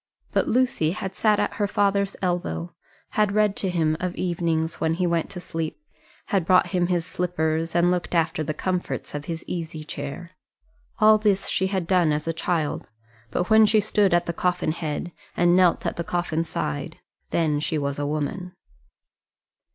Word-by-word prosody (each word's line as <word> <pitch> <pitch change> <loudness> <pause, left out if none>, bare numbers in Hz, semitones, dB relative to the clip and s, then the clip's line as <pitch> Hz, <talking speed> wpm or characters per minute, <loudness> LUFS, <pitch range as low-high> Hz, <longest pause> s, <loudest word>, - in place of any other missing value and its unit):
But - - +1
Lucy 240 -10 +2
had 190 0 -5
sat 210 +1 +2
at - - 0
her 205 -1 +1
father's 200 -1 +1
elbow, 130 - -2 0.4
had 210 -2 +1
read 210 -1 +3
to 190 - -1
him 160 -3 +1
of 180 0 -3
evenings 170 -2 -1
when 160 0 +1
he 180 +1 0
went 170 -2 0
to 180 - -6
sleep, 165 -2 -4 0.5
had 195 -3 +2
brought 185 +2 +4
him 180 -2 +1
his 175 -2 0
slippers 165 -3 -1
and 175 +1 +4
looked 180 0 -1
after 160 -1 +1
the 155 0 -3
comforts 185 -1 -3
of 145 0 -5
his 165 -1 -5
easy 160 -3 -5
chair. 145 +4 -6 0.7
All 215 -1 +6
this 205 -2 +1
she 190 - +1
had 190 -3 -1
done 175 -3 +3
as 150 +1 -2
a 165 - 0
child; 160 -2 -2 0.4
but 180 - -2
when 220 0 +7
she 215 +1 +4
stood 205 -1 +2
at 175 0 +3
the 170 - -2
coffin 180 -2 0
head, 160 +1 -4 0.3
and 175 0 +4
knelt 180 -2 +4
at - - -2
the 170 - -1
coffin 170 -2 -1
side, 115 - -4 0.3
then 155 -3 +1
she 155 +1 -1
was 140 -1 -2
a 145 - -1
woman. 165 +5 -3
175 Hz, 180 wpm, -24 LUFS, 160-185 Hz, 0.7 s, when